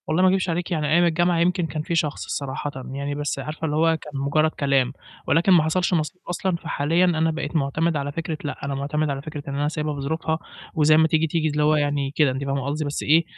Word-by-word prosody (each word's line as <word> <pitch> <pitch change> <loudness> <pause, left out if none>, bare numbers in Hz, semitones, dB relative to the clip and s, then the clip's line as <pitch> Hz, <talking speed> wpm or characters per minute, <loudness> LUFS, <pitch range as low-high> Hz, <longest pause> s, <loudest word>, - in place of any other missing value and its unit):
والله 165 +4 +2
ما 185 - +6
أكدبش 190 -1 +1
عليكِ، 175 +2 -2
يعني 155 -3 0
أيام 175 +2 +5
الجامعة 175 0 +2
يمكن 175 0 +2
كان 155 0 -4
في 170 +2 -2
شخص 150 -3 0
صراحةً، 140 +1 -3 0.2
يعني 140 +1 -3
بس 145 -1 -2
عارفة 155 +4 -5
اللي 150 -1 -1
هو 165 +1 +3
كان 150 - -10
مجرّد 155 +3 +2
كلام، 135 -3 +1 0.3
ولكن 170 +5 +3
ما 170 -4 +6
حصلش 180 +4 +1
نصيب 165 +2 -1
أصلًا، 180 +1 -1
فحاليًا 165 +2 +1
أنا 165 -2 +2
بقيت 160 0 -4
مُعتمد 155 +3 +1
على 140 0 -3
فكرة، 160 +1 -4
لأ، 145 - -5
أنا 140 0 -2
مُعتمد 150 +2 -1
على 135 -1 -3
فكرة 150 0 -7
إن 140 - -4
أنا 145 +1 0
سيابها 150 -1 -2
بظروفها 160 +3 -2 0.4
وزي 155 -1 +5
ما 160 0 +5
تيجي، 160 0 +2
تيجي، 160 0 0
اللي 150 0 0
هو 155 +1 +4
يعني 145 -2 0
كده 145 -2 +3
أنتِ 135 +2 -4
فاهمة 135 -1 -2
قصدي، 150 +2 -2
بس 145 - -3
إيه، 160 +3 +4
155 Hz, 240 wpm, -23 LUFS, 145-165 Hz, 0.4 s, ما